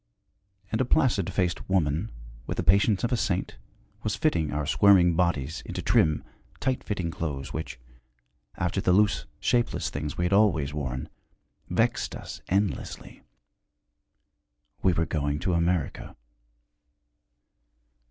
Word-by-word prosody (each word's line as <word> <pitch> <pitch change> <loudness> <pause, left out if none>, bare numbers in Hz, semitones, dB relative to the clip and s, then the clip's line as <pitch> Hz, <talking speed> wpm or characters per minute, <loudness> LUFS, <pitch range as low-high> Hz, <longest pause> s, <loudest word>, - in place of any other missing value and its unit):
And 110 - +1
a - - +2
placid 115 -7 +2
faced 90 -2 -1
woman 85 +1 +1 0.4
with - - -3
the - - 0
patience 100 +2 +3
of 120 - 0
a - - +3
saint 95 -5 -1 0.4
was 105 -1 -1
fitting 85 - +1
our 75 0 -2
squirming 90 0 +5
bodies 85 -3 0
into - - -5
trim, 75 -1 +3 0.4
tight 130 -1 -1
fitting 90 -5 -2
clothes, 70 -5 -4
which, 80 -6 -5 0.8
after 85 +3 -1
the 90 - +3
loose, 105 +2 +2
shapeless 120 -2 0
things 75 +1 -4
we 85 - 0
had 90 - 0
always 85 -9 +3
worn, 65 -4 -3 0.6
vexed - - 0
us - - -8
endlessly. 100 +1 -2 1.6
We 95 - +3
were 85 0 +1
going 75 -2 -1
to 90 - 0
America. 85 -2 -1
90 Hz, 130 wpm, -27 LUFS, 75-100 Hz, 1.6 s, squirming